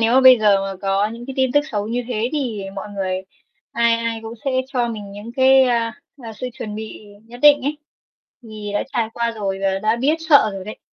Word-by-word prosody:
Nếu 230 +2 +3
mà 265 - +6
bây 255 -2 +8
giờ 205 -2 +4
mà 195 0 -4
có 195 +1 +1
những 235 +2 -9
cái 270 - -6
tin 260 -1 +1
tức 290 - +5
xấu 210 -3 -2
như 245 +2 -1
thế 235 -1 -1
thì 245 -9 -2
mọi 200 +1 -6
người 190 -1 -2 0.5
ai 235 0 +3
ai 230 -1 -3
cũng 225 +1 -7
sẽ 275 - 0 0.2
cho 245 -3 -1
mình 210 -3 -7
những 205 +3 -9
cái, 265 0 +6
a, 235 -3 +1 0.3
a, 225 - -7
sự 255 - -6
chuẩn 210 -2 -7
bị 215 0 -8 0.2
nhất 240 +1 -12
định 290 -1 +7
ấy, 290 +3 -2 0.6
thì 215 -2 -8
đã - - +1
trải 225 -2 0
qua 235 0 0
rồi 200 -4 -3
và 195 0 +1
đã 220 +2 +2
biết 275 +6 +2
sợ 285 -8 +6
rồi 195 -1 -7
đấy, 215 - -8
230 Hz, 235 wpm, -20 LUFS, 210-250 Hz, 0.6 s, bây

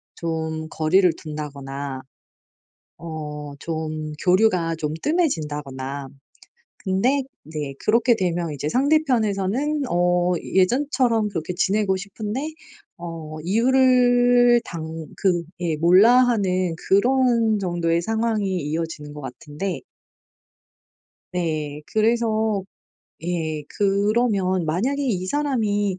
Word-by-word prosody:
좀 160 -1 -3
거리를 175 +3 +3
둔다거나 140 -3 -6 1.0
어 150 -3 -6
좀 155 -1 -4
교류가 180 -3 +3
좀 155 -1 -3
뜸해진다거나 145 - -2 0.7
근데 235 +9 +1 0.2
네 150 -3 -5
그렇게 235 +2 +4
되면 175 -4 -1
이제 145 +1 -3
상대편에서는 260 - +1
어 175 0 +2
예전처럼 240 +2 +2
그렇게 170 -3 -4
지내고 190 +1 +1
싶은데 215 +10 -5 0.4
어 165 -2 -7
이유를 245 +2 +4
당 160 -1 -6
그 180 -4 +1 0.2
예 165 -3 -1
몰라하는 185 0 +4
그런 235 0 +3
정도의 170 -3 0
상황이 220 -2 0
이어지는 150 -1 -4
것 150 - -8
같은데 150 +8 -5 1.5
네. 155 -4 -2
그래서 220 -2 +1 0.6
예 160 -3 -2
그러면 200 -2 +1
만약에 230 - 0
'이 195 -9 -1
사람이 210 -8 0
185 Hz, 210 characters per minute, -23 LUFS, 160-230 Hz, 1.5 s, 그렇게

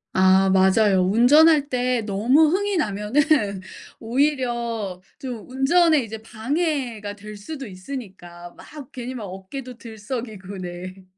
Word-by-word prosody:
아 190 +1 +5
맞아요. 190 +1 +4
운전할 285 - +5
때 250 -2 0
너무 230 +10 +3
흥이 400 +2 0
나면은 210 - +1 0.4
오히려 235 -6 -1 0.2
좀 255 -5 -7
운전에 305 +2 +3
이제 220 0 -7
방해가 235 -2 -3
될 210 +1 -10
수도 270 +7 -8
있으니까 185 -5 -9
막 295 -4 -12
괜히 255 0 -6
막 225 - -6
어깨도 230 +7 -8
들썩이고 220 -4 -7
네. 185 +1 -8
230 Hz, 245 characters per minute, -22 LUFS, 195-270 Hz, 0.4 s, 아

